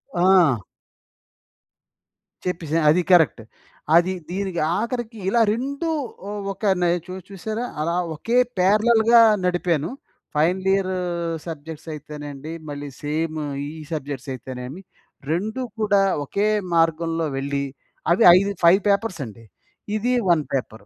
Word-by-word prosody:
ఆ! 175 Hz, -7 st, +5 dB, 1.9 s
చెప్పేసాను 165 Hz, -3 st, -1 dB
అది 170 Hz, +4 st, +4 dB
కరెక్ట్. 160 Hz, -10 st, +4 dB, 0.5 s
అది 175 Hz, +2 st, +4 dB, 0.2 s
దీనికి 190 Hz, -1 st, -3 dB, 0.2 s
ఆఖరికి 235 Hz, 0 st, -3 dB
ఇలా 235 Hz, +3 st, +3 dB
2 280 Hz, +7 st, -3 dB, 0.6 s
ఒక 195 Hz, -, -20 dB, 0.2 s
నె 175 Hz, -, +3 dB, 0.2 s
చు 180 Hz, -, -8 dB, 0.2 s
చూసారా? 215 Hz, +5 st, -4 dB, 0.2 s
అలా 170 Hz, +2 st, 0 dB, 0.2 s
ఒకే 230 Hz, +11 st, -1 dB, 0.2 s
పారలెల్‌గా 220 Hz, +4 st, +5 dB, 0.2 s
నడిపాను. 175 Hz, -4 st, 0 dB, 0.5 s
ఫైనల్ 180 Hz, +5 st, +1 dB
ఇయర్ 195 Hz, -1 st, 0 dB, 0.6 s
సబ్జెక్ట్స్ 160 Hz, 0 st, -8 dB
అయితేనండి. 145 Hz, 0 st, -8 dB, 0.2 s
మళ్ళీ 145 Hz, 0 st, -6 dB
సేమ్ 155 Hz, +2 st, -2 dB, 0.3 s
ఈ -, -, -5 dB, 0.2 s
సబ్జెక్ట్స్ 140 Hz, -3 st, -5 dB
అయితేనేమి. 130 Hz, -, -7 dB, 0.5 s
2 215 Hz, +9 st, -2 dB, 0.2 s
కూడా 205 Hz, -2 st, +3 dB, 0.2 s
ఒకే 200 Hz, +8 st, 0 dB, 0.3 s
మార్గంలో 165 Hz, 0 st, +1 dB
వెళ్ళి, 140 Hz, +1 st, -2 dB, 0.5 s
అవి 185 Hz, +6 st, +4 dB
ఐదు 200 Hz, +1 st, +1 dB
5 180 Hz, +4 st, +6 dB
పేపర్స్ 200 Hz, -2 st, 0 dB
అండి. 115 Hz, 0 st, -12 dB, 0.5 s
ఇది 240 Hz, +4 st, 0 dB, 0.2 s
1 165 Hz, -3 st, +4 dB
పేపర్. 115 Hz, -5 st, -3 dB
170 Hz, 110 wpm, -23 LUFS, 150-200 Hz, 1.9 s, 5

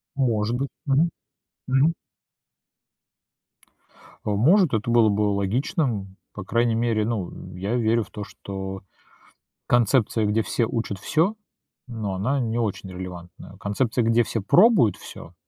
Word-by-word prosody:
Может 120 Hz, -3 st, 0 dB
быть. 140 Hz, +1 st, -2 dB, 0.2 s
Мгм. 150 Hz, +5 st, +3 dB, 0.6 s
Мгм. 135 Hz, +5 st, +3 dB, 2.3 s
А, -, -, -1 dB
может, 160 Hz, -, +4 dB
это 110 Hz, +2 st, -1 dB
было 115 Hz, -2 st, +5 dB
бы 100 Hz, +1 st, 0 dB
логичным, 105 Hz, -, -1 dB, 0.2 s
по 105 Hz, -, -7 dB
крайней 115 Hz, +3 st, +1 dB
мере, 115 Hz, -2 st, +1 dB
ну, 110 Hz, -6 st, -2 dB
м, 90 Hz, 0 st, -10 dB
я 100 Hz, +6 st, -2 dB
верю 115 Hz, -1 st, +2 dB
в -, -, -17 dB
то, 105 Hz, -, -6 dB
что 95 Hz, -1 st, -7 dB, 0.9 s
концепция, 120 Hz, -2 st, +2 dB
где 105 Hz, +2 st, +1 dB
все 115 Hz, +1 st, 0 dB
учат 115 Hz, -4 st, -3 dB
всё- 170 Hz, -, +1 dB, 0.5 s
но 110 Hz, -5 st, -4 dB
она 130 Hz, +9 st, 0 dB
не 115 Hz, -2 st, -1 dB
очень 105 Hz, -4 st, -2 dB
релевантная. 90 Hz, -1 st, -9 dB
Концепция, 115 Hz, +4 st, 0 dB
где 115 Hz, +1 st, +3 dB
все 115 Hz, -, -3 dB
пробуют 180 Hz, -, +5 dB
всё- 85 Hz, -, -11 dB
115 Hz, 135 wpm, -24 LUFS, 100-125 Hz, 2.3 s, было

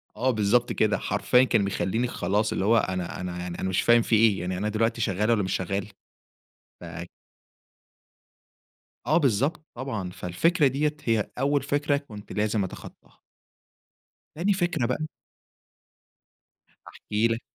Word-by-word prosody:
آه، 130 Hz, +4 st, +1 dB
بالضبط 110 Hz, +2 st, +2 dB
كده، -, -, +2 dB
حرفيًا 125 Hz, +1 st, +2 dB
كان 115 Hz, -5 st, +2 dB
بيخلِّيني 110 Hz, +5 st, -1 dB
خلاص، 105 Hz, -1 st, 0 dB
اللي 95 Hz, -, -1 dB
هو 115 Hz, +2 st, +5 dB
أنا 90 Hz, -3 st, -2 dB
أنا 90 Hz, -1 st, -5 dB
يعني 90 Hz, -1 st, -6 dB
أنا 95 Hz, -, -1 dB
مش 95 Hz, -, +1 dB
فاهم 120 Hz, 0 st, +5 dB
في 115 Hz, -, +1 dB
إيه، 110 Hz, -4 st, +4 dB
يعني 90 Hz, +1 st, -3 dB
أنا 105 Hz, +3 st, -1 dB
دلوقتي 115 Hz, +2 st, 0 dB
شَغَّال 105 Hz, +2 st, 0 dB
والّا 105 Hz, -4 st, +2 dB
مش 95 Hz, -, -2 dB
شَغَّال؟ 95 Hz, +2 st, -2 dB, 0.9 s
ف -, -, -10 dB, 2.2 s
آه، 155 Hz, -, +3 dB
بالضبط 140 Hz, +3 st, +1 dB
طبعًا، 110 Hz, -8 st, -4 dB
فالفكرة 140 Hz, -, +1 dB
ديّة 150 Hz, +3 st, 0 dB
هي 110 Hz, -3 st, 0 dB
أول 140 Hz, +1 st, +1 dB
فكرة 145 Hz, 0 st, +1 dB
كُنت 105 Hz, -8 st, -10 dB
لازم 105 Hz, -1 st, 0 dB
أتخَطَّاهَا. 95 Hz, -, -10 dB, 1.1 s
تاني 190 Hz, +6 st, +1 dB
فكرة 175 Hz, -8 st, 0 dB
بقى. 155 Hz, +5 st, -2 dB, 1.8 s
هاحكي 105 Hz, +2 st, -1 dB
لك. 115 Hz, +1 st, -2 dB
115 Hz, 140 wpm, -26 LUFS, 100-135 Hz, 2.2 s, هو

